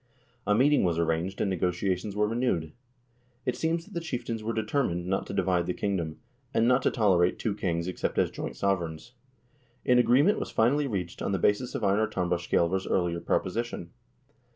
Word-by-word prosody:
A 105 - +4
meeting 145 +6 +4
was 85 -3 +1
arranged, 85 +3 -1
and 100 - +1
negotiations 90 +2 -1
were 105 0 +2
renewed. 110 -9 -1 0.7
It 125 - 0
seems 165 +1 -1
that 205 - -15
the 170 - -1
chieftains 120 -8 -4
were 115 - -1
determined 110 -6 -1
not 95 +2 -1
to - - -6
divide 90 -2 +1
the 90 - -1
kingdom, 85 -6 -2 0.4
and 115 +1 +4
not 125 +1 +4
to - - +3
tolerate 90 -6 +3
two 110 - -1
kings 85 -4 -2
except 90 - -3
as - - +2
joint - - -5
sovereigns. 95 +2 -2 0.7
An 125 -1 +5
agreement 135 - +4
was - - -4
finally 140 +6 +2
reached 90 -7 -4
on 100 - -1
the - - +2
basis 105 +7 +1
of - - -3
Einar 105 +2 +3
Tambarskjselver's 90 0 0
earlier 85 -2 0
proposition. 95 -1 -2
100 Hz, 175 wpm, -28 LUFS, 90-120 Hz, 0.7 s, An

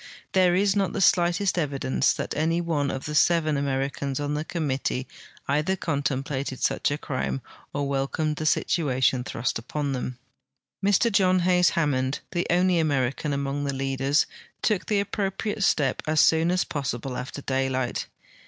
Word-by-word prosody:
There 185 -2 +4
is 200 +1 +2
not 195 -3 +1
the - - -2
slightest 175 +1 +3
evidence 135 -3 +1
tliat - - -4
any 160 +3 +1
one 160 -5 0
of 135 - -4
the 150 - -4
seven 155 -1 +3
Americans 140 0 -2
on 145 0 -2
the 150 +1 -1
committee 135 -5 -2 0.4
either 150 +7 +1
contemplated 140 -4 -2
such - - +1
a 145 - -1
crime 135 -3 -3 0.3
or 145 0 -2
welcomed 140 +3 -1
the 155 - -1
situation 130 -6 +1
thrust 115 -1 -2
U{)on 140 +3 -3
them. 125 -1 -4 0.7
Mr 205 +4 +3
John 185 -2 +3
Hays 180 0 +4
Hammond, 135 -4 0
the 175 0 -1
only 180 0 +3
American 140 -2 0
among 140 0 -2
the 140 -1 -2
leaders, 135 +2 +1 0.4
took 215 -5 +1
the 205 -2 +2
aj)propriate 205 +1 -3
step 135 -8 +2
as 155 0 +2
soon 160 +2 +4
as 180 +1 +2
possible 130 -4 -4
after 135 +3 -6
daylight. 130 -2 -1
145 Hz, 155 wpm, -25 LUFS, 135-175 Hz, 0.7 s, There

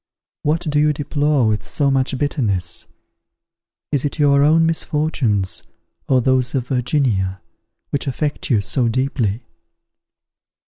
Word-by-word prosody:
What 155 +3 0
do 145 -1 +1
you 150 0 +3
deplore 145 -2 +1
with 110 -1 -1
so 140 -2 0
much 135 0 +1
bitterness? 105 - -1 1.0
Is 145 -3 +1
it 145 - -2
your 140 -2 +4
own 160 +3 +4
misfortunes, 150 - 0 0.5
or 130 -1 +4
those 130 +1 +1
of 125 -2 -2
Virginia, 125 -8 0 0.5
which 145 +1 -1
affect 145 +3 -2
you 115 -6 +3
so 115 +5 +1
deeply? 120 -3 -1
135 Hz, 125 wpm, -20 LUFS, 115-145 Hz, 1.0 s, your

